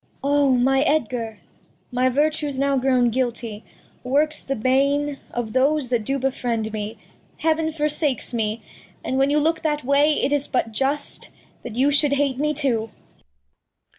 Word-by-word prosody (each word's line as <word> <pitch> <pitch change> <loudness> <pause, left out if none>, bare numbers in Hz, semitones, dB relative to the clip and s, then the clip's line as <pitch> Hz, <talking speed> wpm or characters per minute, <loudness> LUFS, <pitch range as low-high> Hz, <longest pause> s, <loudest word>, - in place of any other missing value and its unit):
Cord. 280 +1 +1
O, 285 -1 +4
my 265 +2 +3
Edgar! 245 -7 0 0.5
My 250 +1 +2
Vertue's 295 +1 0
now 275 +1 +1
grown 255 -2 +2
guilty, 235 -3 -3 0.4
works 295 +4 +1
the 275 - -2
Bane 275 +4 +1
Of 230 -3 -4
those 275 0 +2
that 240 -3 0
do 275 +4 0
befriend 240 -4 -2
me, 215 0 -4 0.4
Heav'n 320 0 +1
forsakes 300 -4 -1
me. 220 -1 -2 0.4
And 260 - -1
when 270 +1 +3
you 295 - +2
look 320 +2 +1
that 300 -2 -1
Way, 285 +3 +3
it 285 -1 0
is 290 -1 0
but 235 -3 -1
just 275 +6 -2 0.3
That 240 -3 -8
you 270 +4 +3
shou'd 290 0 +3
hate 280 -2 0
me 300 +1 0
too. 240 -6 0
270 Hz, 160 wpm, -22 LUFS, 245-290 Hz, 0.5 s, O